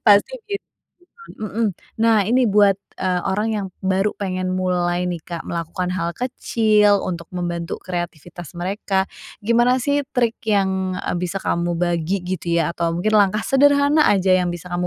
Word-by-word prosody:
pasti 205 Hz, -, +5 dB
begitu 400 Hz, -2 st, -5 dB, 0.5 s
kan. 460 Hz, -, -15 dB
Mhm. 215 Hz, +2 st, -1 dB, 0.3 s
Nah, 225 Hz, -2 st, +4 dB
ini 250 Hz, +2 st, +3 dB
buat, 200 Hz, -1 st, +4 dB, 0.2 s
eee, 180 Hz, -1 st, +1 dB
orang 210 Hz, +3 st, 0 dB
yang 200 Hz, -2 st, -2 dB, 0.2 s
baru 190 Hz, +2 st, +1 dB
pengen 185 Hz, -2 st, -2 dB
mulai 180 Hz, -1 st, 0 dB
nih 170 Hz, -2 st, -5 dB
Kak 170 Hz, -1 st, -5 dB
melakukan 170 Hz, +2 st, -3 dB
hal 170 Hz, -2 st, -2 dB
kecil 215 Hz, -5 st, +2 dB
untuk 170 Hz, -2 st, -4 dB
membantu 170 Hz, -1 st, -3 dB
kreativitas 175 Hz, -1 st, -6 dB
mereka, 190 Hz, +2 st, -1 dB, 0.4 s
gimana 240 Hz, +3 st, +3 dB
sih 285 Hz, 0 st, 0 dB
trik 235 Hz, -2 st, +1 dB
yang, 190 Hz, -3 st, +1 dB
eee, -, -, -2 dB
bisa 180 Hz, +2 st, -3 dB
kamu 170 Hz, 0 st, 0 dB
bagi 175 Hz, +2 st, -1 dB
gitu 180 Hz, -1 st, -4 dB, 0.2 s
ya 155 Hz, -, -1 dB
atau 170 Hz, -1 st, -1 dB
mungkin 180 Hz, +5 st, 0 dB
langkah 205 Hz, +2 st, +3 dB
sederhana 285 Hz, +3 st, +4 dB
aja 190 Hz, -1 st, +3 dB
yang 180 Hz, -1 st, +3 dB
bisa 175 Hz, +1 st, -9 dB
kamu 175 Hz, 0 st, -1 dB
190 Hz, 160 wpm, -21 LUFS, 175-215 Hz, 0.5 s, pasti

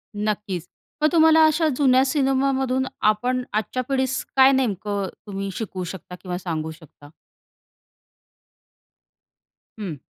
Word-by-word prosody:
नक्कीच, 205 Hz, -4 st, -3 dB, 0.4 s
मग 305 Hz, -, +5 dB
तुम्हाला 320 Hz, -1 st, +6 dB
अशा 315 Hz, +1 st, +2 dB
जुन्या 260 Hz, -2 st, +4 dB
सिनेमामधून 265 Hz, -2 st, +1 dB, 0.3 s
आपण 250 Hz, +4 st, -2 dB
आजच्या 220 Hz, +4 st, -1 dB
पिढीस 265 Hz, -1 st, 0 dB
काय 265 Hz, 0 st, +7 dB
नेमकं 205 Hz, -6 st, -1 dB, 0.2 s
तुम्ही 195 Hz, -1 st, -4 dB
शिकवू 190 Hz, -4 st, -4 dB
शकता 180 Hz, 0 st, -8 dB
किंवा 180 Hz, -2 st, -4 dB
सांगू 160 Hz, -3 st, -4 dB
शकता? 155 Hz, -2 st, -16 dB, 2.7 s
हं. 180 Hz, -7 st, -4 dB
225 Hz, 105 wpm, -23 LUFS, 190-265 Hz, 2.7 s, काय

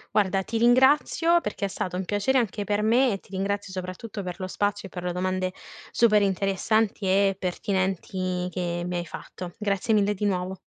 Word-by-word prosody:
Guarda, 195 Hz, -2 st, +2 dB
ti 225 Hz, -, -3 dB
ringrazio 265 Hz, +8 st, +4 dB
perché 210 Hz, -4 st, -3 dB
è -, -, 0 dB
stato 180 Hz, -2 st, -4 dB
un 190 Hz, -, -3 dB
piacere 205 Hz, +8 st, +1 dB
anche 220 Hz, -3 st, 0 dB
per 205 Hz, +1 st, 0 dB
me 240 Hz, +3 st, +4 dB
e 195 Hz, -, -2 dB
ti -, -, -22 dB
ringrazio, 200 Hz, 0 st, -2 dB
soprattutto, 190 Hz, +3 st, -6 dB
per 180 Hz, -1 st, -5 dB
lo 185 Hz, -, -3 dB
spazio 205 Hz, +1 st, -1 dB
e -, -, -16 dB
per 180 Hz, -1 st, -7 dB
le 180 Hz, -, -1 dB
domande 185 Hz, +1 st, -1 dB, 0.4 s
super 215 Hz, -3 st, +4 dB
interessanti 200 Hz, +2 st, +1 dB
e 195 Hz, +1 st, +3 dB
pertinenti 185 Hz, -1 st, -2 dB
che 175 Hz, -1 st, -3 dB
mi 180 Hz, -, -3 dB
hai 175 Hz, 0 st, -2 dB
fatto. 175 Hz, +2 st, -8 dB
Grazie 210 Hz, 0 st, 0 dB
mille 205 Hz, -1 st, +3 dB
di 205 Hz, +1 st, -6 dB
nuovo. 185 Hz, -1 st, -1 dB
195 Hz, 190 wpm, -26 LUFS, 185-210 Hz, 0.4 s, ringrazio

